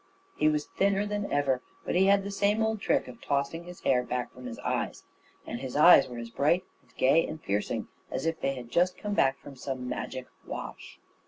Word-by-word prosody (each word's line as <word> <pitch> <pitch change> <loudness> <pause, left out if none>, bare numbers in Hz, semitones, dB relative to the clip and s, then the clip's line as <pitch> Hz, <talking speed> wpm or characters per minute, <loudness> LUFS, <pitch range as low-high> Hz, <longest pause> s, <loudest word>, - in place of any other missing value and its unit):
He 150 - +2
was 150 -1 0
thinner 200 +1 +1
than 205 0 -3
ever, 135 -3 +1 0.2
but - - -1
he 190 +2 +4
had 200 0 +5
the 200 - -4
same 205 +2 +2
old 220 -1 0
trick - - +1
of 120 -2 -11
tossing 140 +4 -1
his 180 0 -10
hair 125 -2 +3
back 125 0 -3
from 125 0 -9
his 115 - -6
eyes; - - -2 0.4
and 120 - -5
his 130 -2 -6
eyes 150 -1 +8
were 120 - -7
as 115 0 -6
bright 150 +9 +2 0.2
and - - -28
gay 140 +6 +4
and 155 - -5
piercing 105 -6 -2 0.2
as - - -3
if 165 0 -1
they 135 0 0
had 120 -2 -9
just 180 +1 +2
come 205 0 -3
back 135 -8 +3
from 140 - -12
some 130 -1 -5
magic 125 0 -4 0.2
wash. - - -7
145 Hz, 220 wpm, -29 LUFS, 125-190 Hz, 0.4 s, eyes